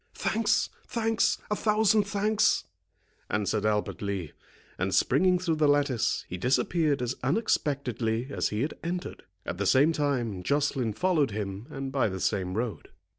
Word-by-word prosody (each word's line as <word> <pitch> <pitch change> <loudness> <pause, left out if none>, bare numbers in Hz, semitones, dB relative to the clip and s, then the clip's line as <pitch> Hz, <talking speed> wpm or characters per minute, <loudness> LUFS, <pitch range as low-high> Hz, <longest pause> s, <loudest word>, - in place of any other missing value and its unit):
"Thanks, 220 -1 +1 0.2
thanks, 225 -1 +1
a - - +3
thousand 215 0 +3
thanks," 210 +1 +2 0.7
answered 105 +1 0
Albert 105 -1 -1
Lee; 100 -6 -3 0.5
and, - - 0
springing 185 0 +3
through 170 -3 -1
the 155 -1 +3
lattice, 145 -5 +1
he 90 - -6
disappeared 135 - +1
as 125 +1 -1
unexpectedly 130 - 0
as - - 0
he 105 +4 -1
had 150 - -2
entered. 175 +2 -5 0.2
At - - -5
the 100 - 0
same 140 - +5
time 130 - -1
Joceline 135 0 0
followed 165 - +2
him, 100 +1 -5
and 135 -2 -5
by 130 -5 +1
the 95 0 -5
same 95 -2 -1
road. 115 0 -3
135 Hz, 150 wpm, -28 LUFS, 110-175 Hz, 0.7 s, same